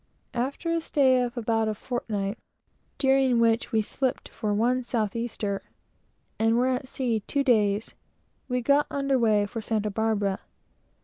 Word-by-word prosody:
After 275 Hz, +7 st, -2 dB
a 335 Hz, 0 st, +1 dB
stay 265 Hz, -5 st, +3 dB
of 245 Hz, 0 st, -3 dB
about 225 Hz, -1 st, +1 dB
a 215 Hz, -, -1 dB
fortnight, 210 Hz, -3 st, -3 dB, 0.6 s
during 265 Hz, -3 st, +3 dB
which 230 Hz, 0 st, +2 dB
we 220 Hz, -1 st, +2 dB
slipped 260 Hz, +4 st, -2 dB
for 215 Hz, -2 st, -3 dB
one 240 Hz, +5 st, +2 dB
south 230 Hz, -4 st, -1 dB
easter, 215 Hz, -4 st, -2 dB, 0.8 s
and 225 Hz, +1 st, +3 dB
were 250 Hz, +2 st, +3 dB
at 260 Hz, 0 st, -2 dB
sea 245 Hz, -4 st, -1 dB
two 280 Hz, -, +1 dB
days, 215 Hz, -5 st, +2 dB, 0.5 s
we 250 Hz, -1 st, 0 dB
got 285 Hz, +3 st, +3 dB
under 275 Hz, -2 st, +1 dB
weigh 215 Hz, -3 st, +3 dB
for 225 Hz, +3 st, -5 dB
Santa 215 Hz, -1 st, -1 dB
Barbara. 205 Hz, -2 st, 0 dB
235 Hz, 150 wpm, -26 LUFS, 215-260 Hz, 0.8 s, stay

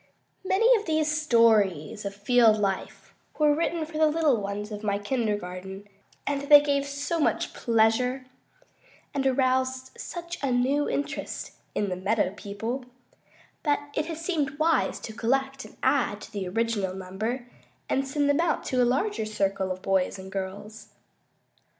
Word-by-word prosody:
Many 450 Hz, +6 st, +4 dB
of 415 Hz, -, -10 dB
these 310 Hz, -1 st, +1 dB
stories 215 Hz, -, +3 dB
of 200 Hz, 0 st, -4 dB
field 220 Hz, +1 st, +4 dB
life 195 Hz, -2 st, -3 dB, 0.2 s
were 300 Hz, -1 st, +4 dB
written 330 Hz, +1 st, -1 dB
for 310 Hz, 0 st, -6 dB
the 315 Hz, -, +6 dB
little 305 Hz, -7 st, +2 dB
ones 205 Hz, +2 st, -4 dB
of 210 Hz, 0 st, -6 dB
my 200 Hz, -1 st, +1 dB
kindergarten, 205 Hz, -4 st, -3 dB, 0.4 s
and 280 Hz, 0 st, -1 dB
they 290 Hz, +1 st, +8 dB
gave 280 Hz, -1 st, 0 dB
so 285 Hz, +4 st, -2 dB
much 300 Hz, -, 0 dB
pleasure, 240 Hz, +3 st, +2 dB, 0.9 s
and 270 Hz, -1 st, +1 dB
aroused 260 Hz, 0 st, +1 dB
such 345 Hz, 0 st, -6 dB
a 275 Hz, -2 st, 0 dB
new 265 Hz, +4 st, +2 dB
interest 285 Hz, -, -3 dB, 0.2 s
in 205 Hz, -, 0 dB
"the 180 Hz, -, -2 dB
meadow 195 Hz, +1 st, 0 dB
people," 225 Hz, +6 st, -5 dB, 0.8 s
that 290 Hz, -1 st, -1 dB
it 305 Hz, -, -1 dB
has 325 Hz, -1 st, -5 dB
seemed 290 Hz, -6 st, -1 dB
wise 315 Hz, +1 st, +2 dB
to 220 Hz, -, -7 dB
collect 270 Hz, +4 st, -1 dB
and -, -, -15 dB
add 245 Hz, -7 st, +2 dB
to -, -, -10 dB
the 200 Hz, -4 st, -4 dB
original 205 Hz, -2 st, -1 dB
number 210 Hz, +7 st, -4 dB, 0.4 s
and 270 Hz, 0 st, 0 dB
send 285 Hz, +1 st, 0 dB
them 285 Hz, +1 st, +3 dB
out 340 Hz, -, 0 dB
to 255 Hz, -1 st, 0 dB
a -, -, +5 dB
larger 265 Hz, -, 0 dB
circle 195 Hz, -3 st, -1 dB
of 185 Hz, 0 st, -6 dB
boys 190 Hz, 0 st, +1 dB
and 190 Hz, 0 st, -9 dB
girls. 200 Hz, +3 st, -6 dB
245 Hz, 155 wpm, -27 LUFS, 205-285 Hz, 0.9 s, they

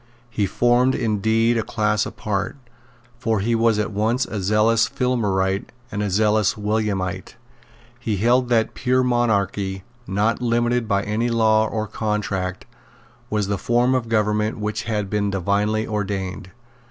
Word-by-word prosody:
He 105 Hz, -4 st, 0 dB
formed 120 Hz, +5 st, +2 dB
indeed 115 Hz, +1 st, +1 dB
a -, -, +2 dB
class 105 Hz, -1 st, 0 dB
apart; 100 Hz, +2 st, -3 dB, 0.6 s
for 115 Hz, -3 st, 0 dB
he 115 Hz, +4 st, 0 dB
was 115 Hz, -1 st, +3 dB
at 105 Hz, 0 st, -1 dB
once 110 Hz, +5 st, 0 dB
a 105 Hz, -, -4 dB
zealous 105 Hz, +3 st, +3 dB
Filmerite 105 Hz, -8 st, 0 dB, 0.3 s
and 105 Hz, -1 st, -3 dB
a 105 Hz, -, -1 dB
zealous 105 Hz, 0 st, +2 dB
Williamite. 105 Hz, -3 st, -2 dB, 0.6 s
He 110 Hz, -4 st, -2 dB
held 120 Hz, +4 st, +2 dB
that 115 Hz, -2 st, +2 dB
pure 130 Hz, +1 st, +1 dB
monarchy, 100 Hz, -6 st, 0 dB, 0.2 s
not 105 Hz, +5 st, 0 dB
limited 120 Hz, 0 st, +1 dB
by 100 Hz, -1 st, +1 dB
any 110 Hz, +4 st, -1 dB
law 110 Hz, -1 st, +3 dB
or 110 Hz, 0 st, -2 dB
contract, 105 Hz, -4 st, -3 dB, 0.6 s
was 105 Hz, -3 st, 0 dB
the 100 Hz, -1 st, -1 dB
form 120 Hz, +2 st, +2 dB
of 125 Hz, -3 st, -1 dB
government 105 Hz, 0 st, +1 dB
which 105 Hz, +1 st, -3 dB
had 105 Hz, -3 st, -1 dB
been 105 Hz, 0 st, 0 dB
divinely 100 Hz, +3 st, 0 dB
ordained. 95 Hz, -3 st, -3 dB
110 Hz, 140 wpm, -22 LUFS, 100-115 Hz, 0.6 s, was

